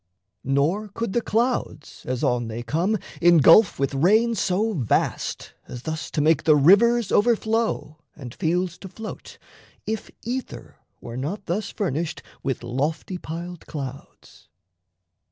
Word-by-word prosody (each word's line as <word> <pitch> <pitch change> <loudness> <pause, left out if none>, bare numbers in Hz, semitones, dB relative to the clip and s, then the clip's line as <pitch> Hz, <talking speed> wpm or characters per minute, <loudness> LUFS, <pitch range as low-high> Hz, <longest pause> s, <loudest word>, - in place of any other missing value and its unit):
Nor 150 +11 +1
could 205 0 -4
the 240 - +1
clouds, 230 - -2
As 125 -1 -2
on 120 -1 +1
they 115 +1 -5
come, 170 - 0 0.2
engulf 170 +4 +6
with 140 +1 -1
rain 215 +11 +3
so 210 +2 0
vast 125 - -1
As 125 0 -8
thus 160 +1 -4
to 150 - -1
make 155 0 +3
the 155 -1 +5
rivers 205 +9 +5
overflow 220 -7 +1 0.2
And 125 -5 -9
fields 175 0 -1
to 190 - -9
float, 215 +4 -9 0.5
if 220 0 -4
ether 250 +3 -6 0.2
were 120 +1 -7
not 180 +10 -4
thus 200 +4 -2
Furnished 170 -4 -3 0.2
with 135 -3 -3
lofty 150 +9 -2
piled 170 +1 -7
clouds. 140 -3 -9
170 Hz, 135 wpm, -24 LUFS, 140-215 Hz, 0.5 s, engulf